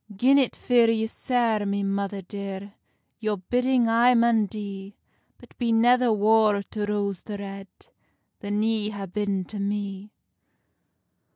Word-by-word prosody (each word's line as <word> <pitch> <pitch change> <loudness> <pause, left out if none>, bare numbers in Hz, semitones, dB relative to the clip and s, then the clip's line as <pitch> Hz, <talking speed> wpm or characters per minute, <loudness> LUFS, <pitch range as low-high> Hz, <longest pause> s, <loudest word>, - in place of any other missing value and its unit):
"Gin 265 +7 +4
it 260 - 0
fear 240 -2 +3
you 220 -1 +1
sair, 230 -2 0
my 200 0 -1
mither 195 0 -2
dear, 200 0 -7 0.5
Your 215 -2 -1
bidding 245 +5 +1
I 235 +2 +4
maun 230 -2 +3
dee; 200 -1 -8 0.4
But - - -18
be 235 -2 0
never 245 +2 +4
war 215 -1 +3
to 210 +1 -4
Rose 200 -3 -2
the 210 -2 -7
Red 195 0 -8 0.7
Than 205 +1 -2
ye 220 -1 0
ha 205 -2 -6
been 195 0 -2
to 205 +3 -8
me." 200 0 -4
210 Hz, 145 wpm, -25 LUFS, 200-230 Hz, 0.7 s, Gin